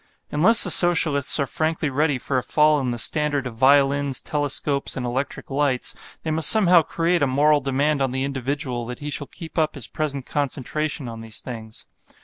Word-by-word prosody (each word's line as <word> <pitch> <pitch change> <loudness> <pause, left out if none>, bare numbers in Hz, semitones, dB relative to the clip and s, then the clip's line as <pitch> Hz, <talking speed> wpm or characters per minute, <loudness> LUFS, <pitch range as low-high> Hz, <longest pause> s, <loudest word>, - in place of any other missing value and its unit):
Unless 200 +10 +5
the - - +2
Socialists 155 -6 +4
are 140 - +1
frankly 155 +1 -2
ready 145 0 0
for 130 +1 -2
a - - -5
fall 150 +3 +2
in 130 -2 -3
the 120 - -3
standard 145 +2 0
of 125 - -6
violins, 140 +2 +2
telescopes 145 -1 -1
and 125 - -4
electric 130 +3 -4
lights, 135 -2 -3
they 160 - -3
must 160 0 +6
somehow 185 -6 +6
create 165 +2 -1
a 145 - +2
moral 145 +3 +2
demand 140 +2 -1
on 135 - 0
the 130 +1 -3
individual 135 -2 -4
that 125 0 -7
he 150 0 -7
shall 145 - -2
keep 165 -1 -7
up 155 -1 -1
his 140 - -4
present 140 -4 -4
concentration 145 0 -3
on 115 -1 -8
these 110 -1 -8
things. 110 -3 -10
140 Hz, 190 wpm, -22 LUFS, 130-155 Hz, -, must